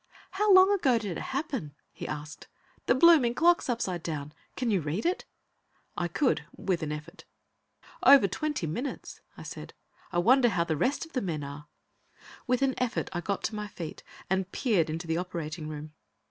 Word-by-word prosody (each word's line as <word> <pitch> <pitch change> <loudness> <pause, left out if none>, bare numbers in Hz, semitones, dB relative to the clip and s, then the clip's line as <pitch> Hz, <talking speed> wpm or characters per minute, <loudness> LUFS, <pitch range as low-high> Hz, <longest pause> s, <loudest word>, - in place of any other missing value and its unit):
"How 415 +2 +2
long 375 +1 +8
ago 270 -11 +3
did 205 -6 -4
it - - -5
happen?" 265 - -4 0.2
he - - -7
asked. 150 0 -7 0.4
"The - - +4
blooming 265 -5 +6
clock's 340 0 +3
upside 190 -8 -1
down; 150 -3 -5 0.2
can 245 -3 -1
you 195 -4 +2
read 155 +7 -3
it?" 360 +2 0 0.7
I 175 - -1
could 250 - +1
with 185 -3 -1
an 155 -1 -3
effort. 155 +5 -8 0.8
"Over 275 -8 +8
twenty 295 - -2
minutes," 240 - -5 0.2
I - - -9
said. - - -9 0.4
"I - - -2
wonder 240 +7 +5
how 180 -5 +1
the 160 -2 -1
rest 270 - 0
of 325 - -19
the 255 - 0
men 160 -6 -3
are?" 145 +1 -8 0.8
With 250 +1 +2
an 265 -1 +2
effort, 250 -2 -1
I 175 - -2
got 200 +3 -3
to 220 - -2
my 210 0 -4
feet 170 -6 -7 0.3
and 190 0 -1
peered 200 - +1
into 165 +2 -4
the 165 0 -1
operating 170 -3 -4
room. 150 0 -7
190 Hz, 185 wpm, -29 LUFS, 160-260 Hz, 0.8 s, long